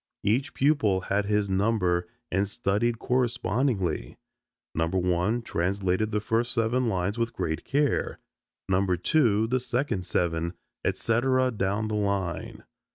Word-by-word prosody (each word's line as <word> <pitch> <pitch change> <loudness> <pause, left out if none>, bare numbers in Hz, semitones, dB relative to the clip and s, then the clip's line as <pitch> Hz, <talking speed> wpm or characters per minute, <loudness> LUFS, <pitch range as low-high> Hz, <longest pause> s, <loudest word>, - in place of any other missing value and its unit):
Each 130 +8 +1
pupil 120 -10 +2
had 100 +2 0
his 105 0 +1
number 95 -3 +1 0.2
and 95 +3 +1
studied 105 +4 0
correspondingly: 120 - 0 0.6
number 80 +3 0
one 90 +6 +1
translated 95 +2 0
the 105 -1 0
first 115 +3 0
seven 120 +2 +1
lines 100 +1 -1
with 115 0 -1
great 80 -7 -2
care, 145 +1 0 0.5
number 95 -1 +2
two 110 - +3
the 130 +3 +1
second 120 -5 -1
seven, 85 -1 -1 0.3
et - - 0
cetera 130 +2 +2
down 105 0 -1
the 110 - -3
line. 100 -4 -2
105 Hz, 130 wpm, -27 LUFS, 95-120 Hz, 0.6 s, two